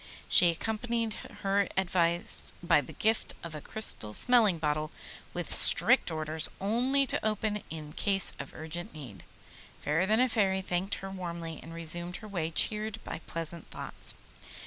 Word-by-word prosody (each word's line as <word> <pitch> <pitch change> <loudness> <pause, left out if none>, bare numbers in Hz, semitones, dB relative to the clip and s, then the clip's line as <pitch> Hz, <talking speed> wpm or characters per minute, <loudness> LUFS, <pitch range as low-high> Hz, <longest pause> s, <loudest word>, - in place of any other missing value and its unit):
She 175 - +5
accompanied 225 +5 -3 0.3
her 195 0 0
advice 175 -2 -1
by 170 - +3
the 130 - -12
gift 220 +1 -1
of 170 -2 -9
a 150 - -8
crystal 110 - +2
smelling 230 -8 +2
bottle, 155 0 -3 0.4
with - - -4
strict - - +9
orders 155 0 -2
only 250 +7 0
to - - -3
open 215 0 -2
it - - -14
in 155 -2 -9
case 195 -2 +1
of 140 - -10
urgent 160 +1 -8
need. 130 -10 -11 0.6
Fairer 165 +6 -1
than 220 +2 +1
a 255 - +3
Fairy 195 -5 -1
thanked 185 +2 -3
her 195 0 -9
warmly, 170 -3 -7
and 165 - -12
resumed 170 +2 -1
her 215 - -10
way 175 -6 -4
cheered 215 +6 -1
by - - -8
pleasant 165 0 -6
thoughts. - - -3
180 Hz, 160 wpm, -28 LUFS, 160-215 Hz, 0.6 s, strict